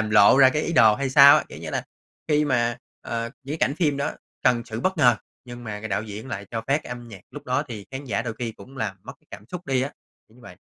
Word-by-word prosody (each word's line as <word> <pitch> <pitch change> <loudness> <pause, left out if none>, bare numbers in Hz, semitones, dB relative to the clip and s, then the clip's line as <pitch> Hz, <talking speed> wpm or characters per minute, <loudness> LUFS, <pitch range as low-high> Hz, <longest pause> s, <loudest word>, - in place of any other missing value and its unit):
làm 110 -1 -2
lộ 105 +3 +7
ra 130 -1 +8
cái 150 +3 -1
ý 170 - -2
đồ 110 -7 +6
hay 135 +1 -2
sao 140 +1 +9
á. - - 0
Kiểu - - -10
như - - -7
là, - - -2 0.4
khi 150 0 +3
mà, 120 -4 +1 0.2
ờ, 115 0 -4
những 140 - -5
cái - - +3
cảnh 145 - -5
phim 150 -6 +1
đó 140 - -2 0.3
cần 120 -2 +3
sự 110 -1 -6
bất 185 +4 0
ngờ 120 -5 +5 0.3
nhưng 120 -1 -10
mà 105 -1 -5
cái 110 - -6
đạo 100 +2 -1
diễn 110 +4 -8
lại 100 -4 -5
cho 115 - -3
phát 140 +3 +2
cái - - -11
âm 120 -1 -7
nhạc 95 -4 -11
lúc 145 - -10
đó 130 +3 +1
thì 105 -4 -8
khán 135 +1 -6
giả 115 -2 -1
đôi 115 -2 -4
khi 115 -2 -3
cũng 135 +4 -15
làm 95 -7 -3
mất - - -9
cái - - -35
cảm 105 +1 -10
xúc 180 0 -7
đi 130 -1 +1
á, 140 - -3 0.4
kiểu 110 - -23
như - - -19
vậy. 90 - -12
120 Hz, 295 wpm, -24 LUFS, 110-140 Hz, 0.4 s, sao